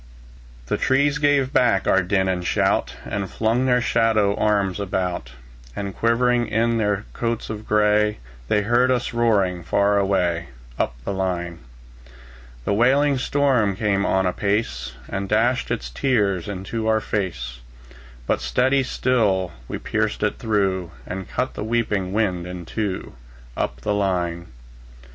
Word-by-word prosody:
The - - -1
trees 140 +2 +2
gave 145 -2 +2
back 115 -6 +3
our 95 - +4
din 95 +1 +1
and 90 -1 -1
shout, - - +1
And 100 -2 -3
flung 115 +4 +1
their 125 -1 +3
shadow 110 -4 +2
arms 100 -3 +1
about; 90 -9 -2 0.4
And 100 -1 -4
shivering 120 +1 +2
in 115 +1 +1
their 105 -1 0
coats 115 -1 -2
of 110 0 -7
gray, 105 0 +3 0.3
They 105 +8 +2
heard 120 +4 +3
us 125 -2 0
roaring 100 -7 +2
far 100 +4 +2
away, 90 -4 +1 0.3
Up - - 0
the - - -2
line. 90 -3 -2 1.1
The - - +1
wailing 135 +5 +3
storm 130 -8 +2
came 100 -1 +1
on 95 -1 +2
apace, 90 - -1
And 100 0 -4
dashed 120 +4 +2
its - - -3
tears 100 - +1
into 105 +3 -4
our 110 0 +3
fade; 100 -5 -2 0.9
But - - 0
steadily 130 +2 +2
still 105 -9 +1 0.2
we - - -4
pierced - - -1
it - - 0
through, 95 -5 0 0.2
And 95 0 -6
cut 130 - -2
the - - -6
sweeping 105 -4 -1
wind 95 -5 0
in 90 -1 -7
two, 100 +1 -3 0.4
Up 60 +3 -3
the 105 - 0
line. 90 -4 -1
105 Hz, 145 wpm, -22 LUFS, 95-115 Hz, 1.1 s, our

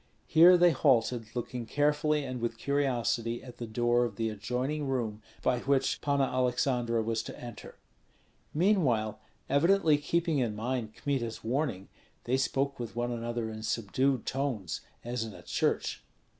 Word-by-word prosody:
Here 175 +3 +7
they 175 0 +6
halted, 125 -5 +2
looking 120 -1 -4
carefully 150 +2 +1
and 130 -2 -5
with 115 -1 -2
curiosity 120 -4 0
at 125 -2 -11
the 120 - -5
door 120 +2 +2
of 115 -4 -3
the 110 0 -1
adjoining 130 +7 -2
room, 115 -5 -2 0.2
by 125 - +2
which 135 +1 +1
Panna 140 -1 +2
Aleksandra 125 -2 +1
was 115 0 -1
to - - -9
enter. 120 -3 -9 0.7
Meanwhile, 150 - +2 0.3
evidently 155 +1 +4
keeping 165 0 0
in 115 -4 0
mind 115 0 -3
Kmita's 125 -6 -2
warning, 120 -6 -1 0.4
they 125 - +1
spoke 135 +1 0
with 115 -2 -5
one 120 0 -1
another 120 -1 -3
in 110 0 -7
subdued 120 +4 0
tones, 125 - -2 0.2
as 120 -1 -2
in 110 -3 -7
a - - -12
church. - - -1
125 Hz, 150 wpm, -30 LUFS, 115-140 Hz, 0.7 s, Here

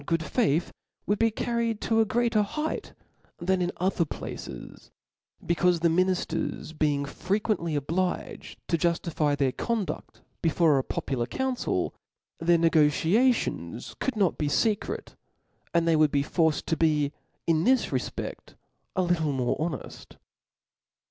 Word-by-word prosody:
sV - - -16
good 165 -1 +1
faith 170 - +1 0.3
would 205 0 0
be 225 0 +4
carried 230 0 -1
to 225 -1 +1
a 225 - +5
greater 235 0 +2
height 300 +10 -3 0.4
than 185 +1 0
in 175 0 0
other 185 0 +1
places 160 - -8 0.5
i - - -19
becaufe 170 +1 +2
the 170 +1 +3
minifters 170 -2 -1
being 145 -2 +1
frequently 180 +1 -1
obliged 175 +6 -2
to 170 - +1
juftify 165 -4 +1
their 135 -2 +2
conduffc 225 - -3 0.2
before 160 -3 +3
a - - -1
popular 125 -3 -2
council, 265 - -1 0.5
their 170 +1 +4
negociations 165 - +2
could 265 - -1
not 195 -5 +1
be 150 - +1
fecret; 210 +8 0 0.6
and 170 -1 +2
they 165 - +4
would 155 -1 +5
be 140 -1 +2
forced 160 +1 +1
to 160 - 0
be, 150 -2 +2 0.3
in 165 -1 +2
this 260 +5 +3
refped, - - -4 0.4
a 185 - +2
little 170 -4 +1
tnore 130 -3 0
honeft. 155 -3 -5
170 Hz, 140 wpm, -27 LUFS, 155-205 Hz, 0.6 s, a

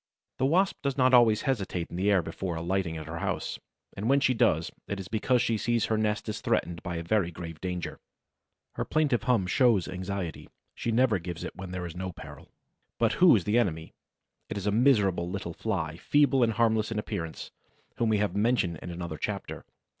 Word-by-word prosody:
The 130 - +3
Wasp 185 +6 +2
does 140 -1 -2
not 130 -1 +4
always 115 -3 +6
hesitate 100 - -2
in - - -6
the 95 +3 +1
air 95 -4 +4
before 85 +2 -4
alighting 85 0 -1
at 80 - -7
her 80 +2 -6
house, - - -3 0.4
and 105 +4 -2
when 140 +1 +5
she 130 -1 +3
does, 80 -8 +2 0.2
it 100 - -3
is 95 - -6
because 115 +4 +1
she 115 -2 0
sees 120 -1 +1
her 110 - 0
nest 105 0 -1
is 105 - -4
threatened 85 -1 -1
by 85 - -4
a 85 - -3
very 95 0 +1
grave 80 -2 -8
danger. 90 -1 -4 0.7
Her - - -2
plaintive 150 -6 +1
hum 120 -8 +2
shows 110 -1 +3
anxiety; 90 -2 -5 0.2
she 115 - -3
never 115 -3 +3
gives 85 0 -6
it - - -6
when 95 0 -7
there 90 -1 -4
is 85 -1 -7
no 95 +1 -4
peril. - - -12 0.5
But - - +2
who 180 -7 +8
is 100 - +1
the 105 +5 +2
enemy? 80 -8 -2 0.6
It - - -4
is 100 - -4
a 105 - +2
miserable 105 -7 +3
little 90 -2 -4
Fly, 85 -7 -3
feeble 145 +5 +3
and 115 -2 +3
harmless 110 -1 +2
in 115 - -2
appearance, 80 -6 -5 0.5
whom 115 - +1
we 110 - +3
have 100 -2 0
mentioned 100 -7 +1
in - - -7
another 85 -2 -5
chapter. - - -4
100 Hz, 205 wpm, -28 LUFS, 85-115 Hz, 0.7 s, who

